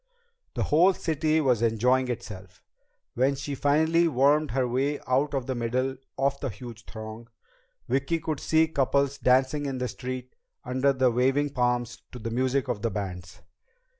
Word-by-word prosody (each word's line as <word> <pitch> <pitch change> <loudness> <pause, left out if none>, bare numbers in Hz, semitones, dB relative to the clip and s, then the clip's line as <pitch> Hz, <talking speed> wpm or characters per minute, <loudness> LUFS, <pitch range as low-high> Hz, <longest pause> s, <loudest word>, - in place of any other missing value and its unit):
The - - 0
whole 175 +5 +4
city 155 -1 0
was 125 -6 +2
enjoying 125 +3 +2
itself. 95 -6 -7 0.5
When 130 +3 +2
she 140 +1 -5
finally 160 +5 +3
wormed 145 +2 +3
her 130 0 0
way 135 +4 0
out 140 +3 +1
of 135 -2 -2
the 130 - -2
middle 130 +2 -1 0.2
of 140 +1 0
the 135 - -3
huge 115 -1 -10
throng, 110 +1 -9 0.6
Vicki 140 +5 0
could 155 -3 -3
see 160 0 +3
couples 140 -1 0
dancing 130 +3 +2
in 135 -1 -3
the 125 0 -2
streets 125 0 -6 0.3
under 130 +2 +1
the 130 -2 +2
waving 135 +4 +1
palms 120 -2 -1
to - - -7
the 115 -1 -5
music 130 +2 0
of 120 -5 -2
the 115 - 0
bands. 95 -3 -6
130 Hz, 165 wpm, -27 LUFS, 120-140 Hz, 0.6 s, whole